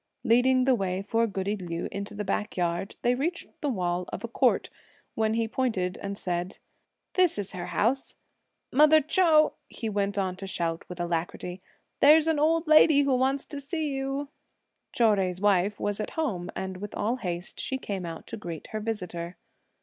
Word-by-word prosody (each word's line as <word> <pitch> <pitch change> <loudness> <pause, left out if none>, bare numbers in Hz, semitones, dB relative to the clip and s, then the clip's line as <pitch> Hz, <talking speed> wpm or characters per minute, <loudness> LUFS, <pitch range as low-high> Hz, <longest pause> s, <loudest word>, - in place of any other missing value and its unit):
Leading 255 +2 +4
the 265 - +5
way 190 -4 -1
for 230 +3 +1
goody 200 0 -2
Liu 175 -4 -4
into 200 +1 -5
the 210 - -3
backyard, 190 -2 -2
they 245 - +4
reached 320 +7 -2 0.2
the 295 - 0
wall 180 -5 -1
of 200 - -6
a - - -2
court, 245 +2 +1 0.4
when 220 0 +1
he 230 0 +1
pointed 215 -7 -1
and 200 0 -4
said, 180 0 -3 0.6
"This 365 - +3
is 205 -2 -3
her 175 -1 -5
house. 260 +5 0 0.6
Mother 305 +3 +7
Chou!" 310 0 +4 0.2
he 225 - -4
went 200 -1 -1
on 190 -2 0
to 195 0 -7
shout 165 -3 -3
with 180 -1 -8
alacrity; 175 +1 -3 0.4
"there's 305 +2 +7
an 320 -2 +2
old 325 +2 +3
lady 310 -2 +6
who 275 -2 +2
wants 265 +2 +1
to 285 -1 -7
see 310 +2 -2
you." 270 +1 -3 0.6
Chou 240 - 0
Jui's 185 -3 -1
wife 205 0 +2
was 205 0 -1
at 215 - -3
home, 195 - -1
and 190 -1 -4
with 205 +2 -7
all 230 +5 0
haste 175 -5 -5
she 265 - -1
came 200 -7 -4
out 165 -1 -7
to 230 - -7
greet 170 -6 -7
her 215 - -2
visitor. 180 -6 -4
210 Hz, 180 wpm, -27 LUFS, 185-270 Hz, 0.6 s, Mother